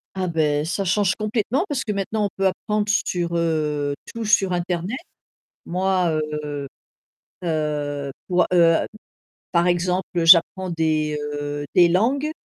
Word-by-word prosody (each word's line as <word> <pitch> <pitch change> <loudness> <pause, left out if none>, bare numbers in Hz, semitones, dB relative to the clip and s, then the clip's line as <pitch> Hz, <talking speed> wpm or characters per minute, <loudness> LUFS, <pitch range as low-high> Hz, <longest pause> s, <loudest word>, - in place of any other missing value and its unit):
Ah 185 -1 -1
beh, 150 -1 +1
ça 185 +4 -2
change 185 +1 +2
complètement 220 - -1
parce 275 -2 -1
que 215 - -3
maintenant 205 +2 -1
on - - -1
peut 195 0 +2
apprendre 210 +2 -1
sur 175 -4 0
heu 150 -3 0 0.2
tout 230 -1 -4
sur 200 -3 +3
internet. 180 +5 -2 0.7
Moi 180 -3 0 0.2
heu, 145 -1 -5 0.8
heu, 150 -3 -2 0.2
pour 180 -1 +2
a - - +1
heu 165 -2 +5 0.8
par 170 0 +2
exemple, 180 +1 0
heu, 165 - +1
j'apprends 180 +2 +6
des 155 -2 0 0.2
heu 145 0 -4
des 175 -1 +6
langues 260 - +1
175 Hz, 145 wpm, -22 LUFS, 155-195 Hz, 0.8 s, j'apprends